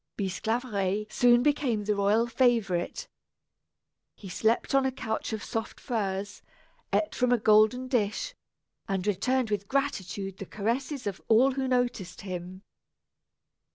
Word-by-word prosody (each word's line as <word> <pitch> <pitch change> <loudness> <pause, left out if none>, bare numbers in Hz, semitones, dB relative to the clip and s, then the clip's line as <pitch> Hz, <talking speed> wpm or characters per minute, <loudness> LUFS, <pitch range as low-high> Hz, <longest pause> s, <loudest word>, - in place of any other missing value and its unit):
Bisclaveret 210 0 -1
soon 240 0 +5
became 265 -7 +1
the 210 +1 +1
royal 205 +3 +2
favorite. 230 -8 +1 1.1
He 195 - -10
slept 225 +8 +1
on 275 0 +4
a 265 - +1
couch 225 -4 -3
of 215 -3 -4
soft 225 0 -4
furs, 205 -4 -3 0.5
ate 315 - +1
from 250 -1 +1
a 245 - +5
golden 220 +4 +4
dish, 250 - -1 0.5
and 195 -3 -1
returned 235 +4 0
with 200 -1 -1
gratitude 200 -8 -2
the 195 - -7
caresses 250 +6 -2
of 200 -2 -4
all 240 +5 +5
who 265 0 -2
noticed 245 -8 -1
him. 185 0 -7
220 Hz, 130 wpm, -28 LUFS, 200-250 Hz, 1.1 s, soon